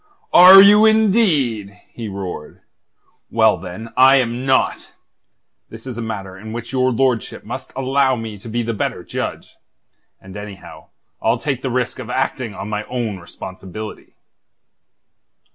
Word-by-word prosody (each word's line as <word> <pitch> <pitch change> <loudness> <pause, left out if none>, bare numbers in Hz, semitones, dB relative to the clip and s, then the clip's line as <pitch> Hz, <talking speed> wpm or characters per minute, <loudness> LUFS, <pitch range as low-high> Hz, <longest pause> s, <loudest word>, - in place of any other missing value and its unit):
"Are 190 +2 +10
you, 210 +2 +7
indeed?" 155 - +1
he 115 -2 -6
roared. 95 -6 -7 0.7
"Well, - - +3
then, 110 +6 -9
I 130 +1 +6
am 125 0 -1
not. 130 -1 0 0.8
This 110 +2 -12
is 130 -3 -6
a 120 - -5
matter 100 -4 -6
in 110 +3 -9
which 120 +1 -6
your 130 0 +2
lordship 125 -1 -1
must - - -7
allow 135 0 +1
me 110 -3 -7
to 115 - -10
be 120 +2 -2
the 115 0 -3
better 105 - -3
judge. - - -6 0.6
And, 95 0 -13
anyhow, 105 -2 -10 0.3
I'll 115 +2 +1
take 135 0 -3
the 135 - -3
risk 125 0 -2
of - - -8
acting 130 -4 -2
on 100 - -6
my 105 0 -3
own 115 -6 -4
responsibility." 95 +4 -9
115 Hz, 145 wpm, -19 LUFS, 105-130 Hz, 0.8 s, Are